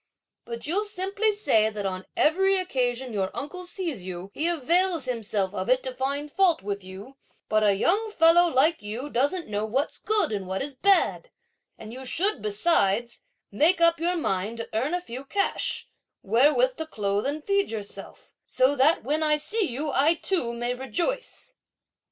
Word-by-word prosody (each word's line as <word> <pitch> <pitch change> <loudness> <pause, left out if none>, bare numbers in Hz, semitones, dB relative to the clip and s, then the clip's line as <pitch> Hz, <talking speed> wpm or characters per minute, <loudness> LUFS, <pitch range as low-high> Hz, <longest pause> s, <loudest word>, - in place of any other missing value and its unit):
But 235 -1 -6
you'll 385 +8 0
simply 405 +2 0
say 225 - +2
that 210 -2 -5
on 185 -1 -4
every 385 +5 +3
occasion 255 -8 -1
your 190 -2 -1
uncle 360 +6 -6
sees 340 - -4
you, 185 +1 -7
he 315 - -1
avails 345 0 +2
himself 215 -6 -2
of - - -3
it - - +3
to - - -5
find 285 - -3
fault 360 - +2
with 200 -1 -4
you, 195 +8 -11 0.3
but 215 0 +2
a 205 -2 +4
young 405 - +1
fellow 340 -2 +5
like 305 +3 +3
you 230 +8 -6
doesn't 285 +8 0
know 210 0 -2
what's 260 +7 -2
good 430 - +2
and 200 -3 -3
what 190 +6 -2
is 285 0 -5
bad; 395 - +2 0.5
and 220 +1 -10
you 260 +1 -8
should, 335 - -1
besides, 215 - +1 0.3
make 320 - +3
up 335 -1 +4
your 350 +2 0
mind 210 - -2
to 230 - -5
earn 270 +10 0
a 360 - -2
few 260 -5 -7
cash, 395 +8 -1 0.4
wherewith 295 - +3
to 320 - -4
clothe 205 -4 -1
and 295 +2 -3
feed 400 +2 +1
yourself, 210 -3 -8
so 260 +3 +2
that, 285 +5 +3
when 300 +6 -1
I 305 -1 +3
see 415 +8 -1
you, 285 +4 -3
I 290 +6 +3
too 330 -9 -1
may 240 +1 -2
rejoice!" 420 - -4
280 Hz, 175 wpm, -26 LUFS, 220-355 Hz, 0.5 s, fellow